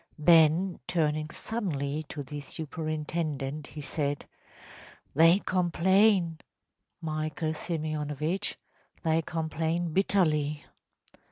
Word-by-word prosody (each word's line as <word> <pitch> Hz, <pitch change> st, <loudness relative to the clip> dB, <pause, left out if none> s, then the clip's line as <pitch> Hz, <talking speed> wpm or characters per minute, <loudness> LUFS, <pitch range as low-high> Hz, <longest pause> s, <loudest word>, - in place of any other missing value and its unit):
‚ÄĚ 150 Hz, -, -8 dB
Then 170 Hz, +2 st, +5 dB
turning 155 Hz, -3 st, 0 dB
suddenly 155 Hz, -9 st, -2 dB
to 145 Hz, -, -5 dB
the 145 Hz, +2 st, -6 dB
superintendent 155 Hz, -1 st, -3 dB
he 150 Hz, -, -8 dB
said: 145 Hz, 0 st, -2 dB, 0.9 s
“They 165 Hz, +4 st, +6 dB
complain, 185 Hz, -1 st, +3 dB, 0.6 s
Michael 155 Hz, 0 st, -2 dB
Simeonovitch! 155 Hz, +2 st, -2 dB, 0.5 s
They 160 Hz, -1 st, +2 dB
complain 160 Hz, +1 st, -2 dB
bitterly. 155 Hz, -6 st, +2 dB
160 Hz, 85 wpm, -29 LUFS, 150-170 Hz, 0.9 s, They